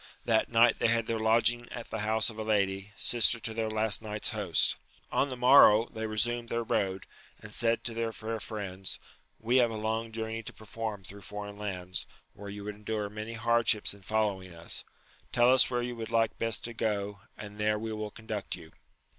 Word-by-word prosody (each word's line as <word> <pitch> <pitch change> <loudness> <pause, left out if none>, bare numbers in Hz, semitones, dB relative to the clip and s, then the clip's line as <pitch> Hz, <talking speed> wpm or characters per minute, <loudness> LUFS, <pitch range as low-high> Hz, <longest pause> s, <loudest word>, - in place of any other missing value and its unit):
That 110 -1 +2
night 115 0 +4
they - - +3
had 115 0 +2
their 115 0 -2
lodging 115 +2 +3
at 120 - -8
the 110 - -3
house 110 +1 +1
of 110 - -11
a - - -2
lady, 100 -2 0
sister 115 0 +3
to 110 - -4
their 110 0 -1
last 110 0 0
night's 105 -1 -1
host. 105 -7 +2 0.3
On 140 - +1
the 130 - -5
morrow 120 -3 +7
they 110 0 -3
resumed 115 +2 0
their 115 0 -1
road, 95 -4 -1 0.3
and - - -11
said 115 0 +3
to 115 - -2
their 115 0 -2
fair 110 0 -4
friends, 100 -3 -4 0.4
we 120 +3 +2
have 120 -2 +5
a 115 - -5
long 110 +1 -2
journey 110 0 -4
to 110 - -9
perform 110 -2 -6
thro* 100 +2 -8
foreign 105 0 -7
lands, 90 -3 -4 0.3
where 100 0 -9
you 100 0 -7
would 105 +1 -4
endure 105 0 -4
many 110 +2 -6
hardships 115 -1 +3
in 100 - -15
following 95 -4 -1
us: 85 0 -2 0.5
tell 120 +1 +5
us 130 - +6
where 120 -1 -1
you 120 0 -4
would 115 -1 -6
like 115 -1 +2
best 115 -2 0
to 120 - -3
go, 105 -2 -2 0.2
and 105 0 -9
there 105 0 +2
we 110 +1 -4
will 105 0 -4
conduct 110 -1 -5
you. 80 -3 -13
110 Hz, 205 wpm, -30 LUFS, 105-115 Hz, 0.5 s, morrow